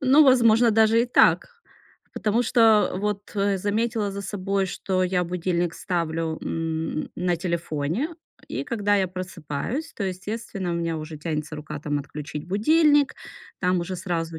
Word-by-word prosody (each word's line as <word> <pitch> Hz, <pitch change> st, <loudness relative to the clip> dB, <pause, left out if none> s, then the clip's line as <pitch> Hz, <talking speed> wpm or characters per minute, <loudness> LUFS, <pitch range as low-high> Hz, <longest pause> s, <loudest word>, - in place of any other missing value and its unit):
Ну, 275 Hz, +3 st, +6 dB
возможно, 235 Hz, -3 st, +5 dB
даже 225 Hz, +1 st, +4 dB
и -, -, -1 dB
так. 245 Hz, -, +4 dB, 0.7 s
Потому 220 Hz, +3 st, +1 dB
что 225 Hz, -3 st, +4 dB
вот, 205 Hz, 0 st, -3 dB
э, 200 Hz, -1 st, +1 dB
заметила 215 Hz, +2 st, 0 dB
за 200 Hz, 0 st, -5 dB
собой, 195 Hz, -1 st, -1 dB
что 185 Hz, 0 st, -1 dB
я 180 Hz, -1 st, +1 dB
будильник 175 Hz, -1 st, -1 dB
ставлю, 165 Hz, -2 st, -2 dB
м, 160 Hz, -1 st, -3 dB
на 180 Hz, -1 st, 0 dB
телефоне, 170 Hz, -, -2 dB, 0.3 s
и -, -, -3 dB
когда 205 Hz, -4 st, +1 dB
я 195 Hz, -1 st, +2 dB
просыпаюсь, 185 Hz, -, -5 dB
то, -, -, -5 dB
естественно, 195 Hz, 0 st, -4 dB
у -, -, -1 dB
меня 165 Hz, -1 st, -1 dB
уже 155 Hz, 0 st, -7 dB
тянется 155 Hz, -1 st, -4 dB
рука, 150 Hz, 0 st, -6 dB
там, 145 Hz, -1 st, -1 dB
отключить 150 Hz, +1 st, -7 dB
будильник. 290 Hz, -, +4 dB, 0.5 s
Там 180 Hz, -1 st, +2 dB
уже 185 Hz, +2 st, -4 dB
сразу 165 Hz, -2 st, -3 dB
185 Hz, 150 wpm, -24 LUFS, 165-220 Hz, 0.7 s, Ну